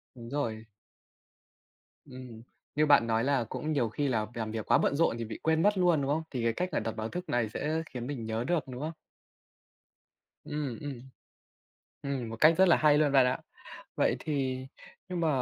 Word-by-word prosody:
Đúng 115 -2 -10
rồi. 115 -6 -2 1.4
Ừm. 125 -4 -10 0.3
Như 155 +1 +3
bạn 140 -5 +6
nói 115 +1 +1
là 140 -3 +2
cũng 155 +7 -4
nhiều 125 -6 +1
khi 140 +6 -1
là 110 -4 0
làm 110 -2 -3
việc 110 -1 -4
quá - - +6
bận 140 - +1
rộn 165 -7 +2
thì 115 - -3
bị 110 - -7
quên 160 0 +2
mất 205 -1 +3
luôn, 175 -5 +3
đúng 135 - -1
không? 160 +2 +1
Thì 125 -4 -3
cái 115 - +2
cách 180 +10 -2
là - - +1
đặt 115 - -3
báo 110 0 -3
thức 180 +6 -6
này 120 -3 +1
sẽ 155 +8 -2
khiến 120 -2 -6
mình 130 -5 -5
nhớ 110 +1 -2
được, 170 +3 0
đúng 125 -1 -7
không? 155 +2 -3 1.5
Ừm, 145 -6 -4
ừm. 140 -5 -6 1.0
Ừm, 135 -4 -3
một 115 - -5
cách 160 +2 +7
rất 190 - +6
là 170 - +6
hay 150 -1 +5
luôn 150 -2 +3
bạn 135 -2 +6
ạ. 125 - +1 0.6
Vậy - - +2
thì 130 -4 -2 0.4
nhưng 180 - -3
mà 165 - +1
135 Hz, 205 wpm, -30 LUFS, 115-155 Hz, 1.5 s, cách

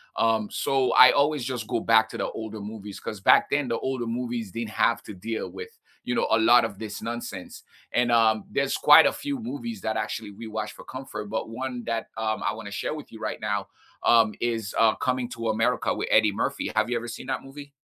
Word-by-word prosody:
Um, 110 -2 +2
so, 135 -1 +1
I 125 - +9
always 145 0 +2
just 125 -2 -3
go 110 - -1
back 110 0 +4
to - - -7
the - - -1
older 110 -1 -7
movies 105 -1 -8
'cause 105 - -6
back 95 - +5
then 145 -2 0
the 115 -1 -1
older 130 -2 -2
movies 115 -2 -3
didn't 115 +1 -4
have 115 +2 +1
to 105 - -9
deal 110 +5 -4
with, 455 +1 -9 0.3
you 125 - -2
know, - - +1
a - - +4
lot 115 +1 +6
of 105 -3 -6
this 105 -1 -6
nonsense. 115 -5 -6 0.3
And, 120 0 +2
um, 110 -2 +4
there's 140 -1 0
quite 150 +2 +8
a - - +2
few 285 -1 -4
movies 235 -1 -6
that 110 - -2
actually 110 -2 -3
we 105 +3 -10
watch 110 -1 -4
for - - -12
comfort, 130 -5 -7
but 110 - -3
one 125 +1 -5
that, 115 -1 -3
um, 110 -1 -2
I 105 - 0
wanna 105 -2 -8
share 100 - -3
with 155 -1 -9
you 110 - -11
right 110 -1 -4
now, 105 -1 -2 0.3
um, 115 -2 +4
is, 115 -4 -2
uh, 110 -1 +5
Coming 130 -1 -1
to 115 -2 -4
America 110 +1 +1
with - - -3
Eddie 110 -1 +5
Murphy, 100 - -2
have 120 - +1
you - - +1
ever 120 +1 -5
seen 120 - -7
that - - -2
movie? 140 +1 -11
115 Hz, 230 wpm, -26 LUFS, 110-130 Hz, 0.3 s, I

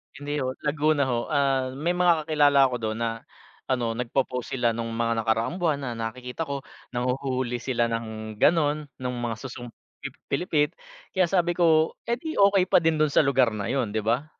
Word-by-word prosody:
Hindi 145 +1 -3
ho, 130 -1 -2
Laguna 150 0 +2
ho, 120 -1 -1
ah, 135 -3 +1
may 155 +5 0
mga 175 -3 +3
kakilala 145 -3 +4
ako 125 - -3
dun 110 -1 -3
na, 115 - +1 0.6
ano, 120 -3 0
nagpo-post 125 +2 -2
sila 120 -2 +2
nung 115 0 -4
mga 115 0 0
nakaraang 115 - 0
buwan 155 -5 0
na 125 - -3
nakikita 125 +7 -5
ko, 140 -1 -4 0.3
nanghuhuli 125 -1 -1
sila 120 -2 0
ng 110 -2 -5
ganon 150 -2 +2
nung 125 -1 -4
mga 120 -1 -2
susong 120 -2 -7 0.3
pi - - -6 0.2
pilipit, 150 0 +1 0.4
kaya 185 -1 +3
sabi 175 -1 +2
ko, 160 -2 +4 0.2
eh, 235 - +1
di 315 +5 -6
okay 200 -1 +5
pa - - +6
din 165 -1 +2
dun 155 - +3
sa 145 - +4
lugar 135 -3 +3
na 105 -2 -4
yun 130 -5 0
'di 110 0 -2
ba? 125 +7 0
135 Hz, 190 wpm, -26 LUFS, 120-155 Hz, 0.6 s, pa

